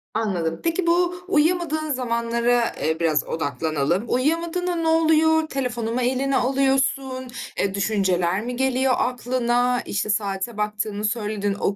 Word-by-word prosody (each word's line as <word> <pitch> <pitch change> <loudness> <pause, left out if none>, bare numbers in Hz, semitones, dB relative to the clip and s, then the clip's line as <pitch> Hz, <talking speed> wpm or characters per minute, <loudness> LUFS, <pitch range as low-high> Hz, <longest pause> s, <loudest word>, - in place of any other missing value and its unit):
Anladım. 175 -7 -1
Peki, 335 +1 0
bu 350 +1 +2
uyuyamadığın 315 -2 +1
zamanlara, 235 -1 0
eee, 160 0 0
biraz 155 -3 +2
odaklanalım. 155 - -1
Uyuyamadığında 335 +7 0
ne 330 -1 -1
oluyor? 320 0 +3
Telefonu 245 -5 -3
mu 255 - 0
eline 260 +2 +1
alıyorsun? 265 0 +1 0.3
Eee, 195 -1 0
düşünceler 190 -3 +1
mi 245 +1 -4
geliyor 265 0 +1
aklına? 245 0 0
İşte, 205 +1 -2
saate 205 +1 -2
baktığını 210 0 -2
söyledin. 210 -2 -1
O 200 - 0
245 Hz, 130 wpm, -23 LUFS, 205-275 Hz, 0.3 s, oluyor